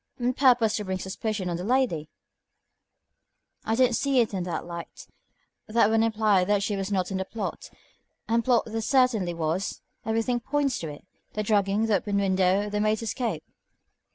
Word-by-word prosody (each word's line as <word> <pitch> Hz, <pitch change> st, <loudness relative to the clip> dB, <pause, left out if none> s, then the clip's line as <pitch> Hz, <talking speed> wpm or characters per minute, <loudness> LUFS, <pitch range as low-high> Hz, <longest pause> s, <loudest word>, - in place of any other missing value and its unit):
"On 245 Hz, +1 st, +1 dB
purpose 245 Hz, -5 st, +4 dB
to 210 Hz, -, -3 dB
bring 190 Hz, -1 st, -2 dB
suspicion 190 Hz, +1 st, -3 dB
on 170 Hz, -1 st, -2 dB
the 175 Hz, -, -5 dB
lady?" 220 Hz, -, 0 dB, 1.5 s
"I 220 Hz, -, 0 dB
don't 250 Hz, -1 st, +3 dB
see 275 Hz, 0 st, +2 dB
it 225 Hz, -3 st, +1 dB
in 190 Hz, -, -1 dB
that 175 Hz, -2 st, -3 dB
light. 170 Hz, -1 st, -8 dB, 0.6 s
That 220 Hz, -1 st, +3 dB
would 225 Hz, 0 st, +3 dB
imply 215 Hz, -4 st, +3 dB
that 200 Hz, +1 st, +1 dB
she 205 Hz, 0 st, -1 dB
was 195 Hz, +1 st, -3 dB
not 185 Hz, -1 st, 0 dB
in 190 Hz, -, -1 dB
the 190 Hz, -, -2 dB
plot, 220 Hz, +3 st, -5 dB, 0.6 s
and 230 Hz, +1 st, +2 dB
plot 245 Hz, -2 st, +3 dB
there 225 Hz, 0 st, -3 dB
certainly 225 Hz, -8 st, +2 dB
was; 165 Hz, +4 st, -2 dB, 0.2 s
everything 225 Hz, +2 st, 0 dB
points 275 Hz, +1 st, -1 dB
to 165 Hz, -, -5 dB
it. 145 Hz, +2 st, -9 dB, 0.3 s
The 215 Hz, -, -2 dB
drugging, 205 Hz, 0 st, +2 dB
the 215 Hz, -3 st, +3 dB
open 200 Hz, +2 st, -3 dB
window, 190 Hz, 0 st, +2 dB
the 210 Hz, 0 st, -2 dB
maid's 215 Hz, +1 st, +1 dB
escape." 230 Hz, +2 st, -2 dB
210 Hz, 180 wpm, -26 LUFS, 190-230 Hz, 1.5 s, purpose